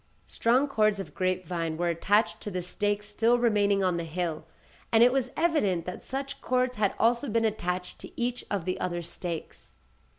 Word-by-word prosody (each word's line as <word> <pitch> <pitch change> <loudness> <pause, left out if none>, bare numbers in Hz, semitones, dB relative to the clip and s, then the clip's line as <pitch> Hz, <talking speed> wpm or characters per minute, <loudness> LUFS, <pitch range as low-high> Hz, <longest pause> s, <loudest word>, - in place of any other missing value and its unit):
Strong 250 +5 +2
cords 215 -6 +2
of 195 - -7
grape 185 -1 -1
vine 165 -2 -2
were 175 +1 0
attached 175 +2 +1
to - - -4
the 180 -2 -3
stakes 205 +3 -1
still 225 +3 +2
remaining 205 -4 +2
on 180 -2 +1
the 170 - -2
hill, 165 -1 -3 0.4
and 225 0 +6
it 245 +1 +5
was 260 -2 0
evident 285 - +1
that 180 - -6
such 275 +1 -5
cords 255 0 0
had 205 -2 +1
also 235 +4 +2
been 225 +1 +2
attached 180 -4 -2
to - - -11
each 245 0 -1
of 195 -5 -2
the 185 - -2
other 175 -1 -2
stakes. 170 -1 -7
205 Hz, 190 wpm, -28 LUFS, 180-235 Hz, 0.4 s, and